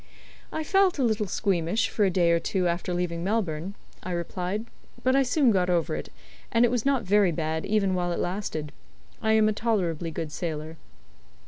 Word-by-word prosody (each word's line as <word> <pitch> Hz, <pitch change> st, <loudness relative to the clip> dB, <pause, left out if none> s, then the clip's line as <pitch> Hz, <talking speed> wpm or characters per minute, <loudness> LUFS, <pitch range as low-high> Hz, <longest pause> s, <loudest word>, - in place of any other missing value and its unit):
"I 315 Hz, -, -2 dB
felt 385 Hz, +1 st, +3 dB
a 270 Hz, -, +1 dB
little 220 Hz, -3 st, +1 dB
squeamish 185 Hz, 0 st, 0 dB
for 210 Hz, -, +1 dB
a -, -, +3 dB
day 175 Hz, -2 st, +3 dB
or 170 Hz, -, +3 dB
two 180 Hz, +1 st, 0 dB
after 175 Hz, +1 st, -2 dB
leaving 175 Hz, -1 st, -2 dB
Melbourne," 190 Hz, -3 st, -1 dB, 0.3 s
I -, -, -7 dB
replied, 180 Hz, +5 st, -3 dB, 0.4 s
"but 260 Hz, +1 st, +3 dB
I 275 Hz, -, +5 dB
soon 265 Hz, -1 st, +3 dB
got 180 Hz, -3 st, +2 dB
over 170 Hz, -, +1 dB
it, 75 Hz, -, -6 dB, 0.4 s
and 230 Hz, +1 st, +5 dB
it 235 Hz, -, +1 dB
was 245 Hz, +1 st, 0 dB
not 270 Hz, -4 st, +2 dB
very 200 Hz, -1 st, +4 dB
bad 160 Hz, 0 st, -2 dB
even 200 Hz, -3 st, +2 dB
while 175 Hz, -1 st, 0 dB
it -, -, -2 dB
lasted. 175 Hz, -5 st, -3 dB, 0.5 s
I 220 Hz, -, +2 dB
am 220 Hz, -1 st, +5 dB
a 215 Hz, -, +2 dB
tolerably 180 Hz, -8 st, -1 dB
good 155 Hz, -1 st, -5 dB
sailor." 160 Hz, -1 st, -4 dB
185 Hz, 195 wpm, -26 LUFS, 170-220 Hz, 0.5 s, I